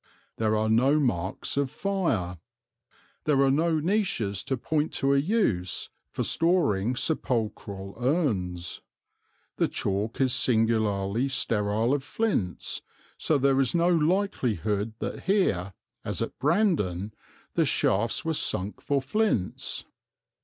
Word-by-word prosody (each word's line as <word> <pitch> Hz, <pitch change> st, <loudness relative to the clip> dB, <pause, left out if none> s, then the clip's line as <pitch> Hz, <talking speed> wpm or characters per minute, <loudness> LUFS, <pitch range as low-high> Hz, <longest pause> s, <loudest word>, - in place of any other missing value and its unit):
There 110 Hz, -1 st, +1 dB
are 110 Hz, +1 st, +1 dB
no 130 Hz, +7 st, +4 dB
marks 100 Hz, -, -1 dB
of 140 Hz, -1 st, +1 dB
fire. 125 Hz, -, -1 dB, 0.9 s
There 145 Hz, -3 st, +3 dB
are 135 Hz, -, +4 dB
no 160 Hz, +3 st, +2 dB
niches 155 Hz, -, 0 dB
to 130 Hz, -, -1 dB
point 150 Hz, +5 st, -1 dB
to 135 Hz, 0 st, +2 dB
a 140 Hz, -, +4 dB
use 140 Hz, -, 0 dB, 0.2 s
for -, -, -3 dB
storing 130 Hz, -, +2 dB
sepulchral 110 Hz, -9 st, -2 dB
urns; 105 Hz, -, -1 dB, 0.8 s
the -, -, +2 dB
chalk 100 Hz, +3 st, -2 dB
is 130 Hz, -2 st, +3 dB
singularly 110 Hz, -2 st, +1 dB
sterile 115 Hz, -2 st, 0 dB
of 145 Hz, -2 st, 0 dB
flints, 145 Hz, -, -2 dB, 0.4 s
so 155 Hz, -, +2 dB
there 135 Hz, 0 st, +3 dB
is 135 Hz, +3 st, +2 dB
no 170 Hz, +1 st, +3 dB
likelihood 125 Hz, -, +1 dB
that -, -, -5 dB
here, 100 Hz, -, +1 dB, 0.3 s
as -, -, -2 dB
at -, -, -4 dB
Brandon, 135 Hz, -, +1 dB, 0.4 s
the -, -, +2 dB
shafts 115 Hz, +9 st, +1 dB
were 165 Hz, -, +1 dB
sunk 100 Hz, -8 st, -1 dB
for 140 Hz, -2 st, 0 dB
flints. 170 Hz, -, -1 dB
125 Hz, 125 wpm, -27 LUFS, 100-155 Hz, 0.9 s, no